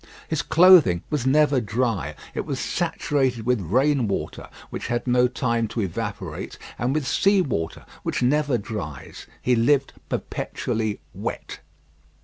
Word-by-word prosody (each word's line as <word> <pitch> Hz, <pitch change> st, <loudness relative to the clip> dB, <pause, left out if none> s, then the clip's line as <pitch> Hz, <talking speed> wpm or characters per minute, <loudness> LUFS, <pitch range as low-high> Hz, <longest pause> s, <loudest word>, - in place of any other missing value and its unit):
His 160 Hz, -2 st, 0 dB
clothing 160 Hz, -, +6 dB
was 145 Hz, -4 st, 0 dB
never 145 Hz, -1 st, +4 dB
dry. 115 Hz, -1 st, -1 dB, 0.2 s
It -, -, -2 dB
was -, -, -4 dB
saturated 130 Hz, -6 st, -1 dB
with 125 Hz, -3 st, +2 dB
rain 130 Hz, -, +2 dB
water, 100 Hz, -, -4 dB, 0.2 s
which -, -, -5 dB
had 120 Hz, 0 st, -1 dB
no 125 Hz, 0 st, +4 dB
time 120 Hz, -2 st, 0 dB
to 110 Hz, +2 st, -3 dB
evaporate, 95 Hz, -5 st, -4 dB, 0.2 s
and 125 Hz, +4 st, 0 dB
with 155 Hz, -3 st, 0 dB
sea 200 Hz, +8 st, +3 dB
water, 80 Hz, -, -3 dB, 0.2 s
which -, -, -2 dB
never 145 Hz, 0 st, +2 dB
dries. 100 Hz, -, -7 dB, 0.2 s
He 125 Hz, -, +3 dB
lived 135 Hz, +4 st, +2 dB, 0.2 s
perpetually 110 Hz, -2 st, -3 dB
wet. -, -, -5 dB
125 Hz, 135 wpm, -24 LUFS, 110-145 Hz, 0.2 s, clothing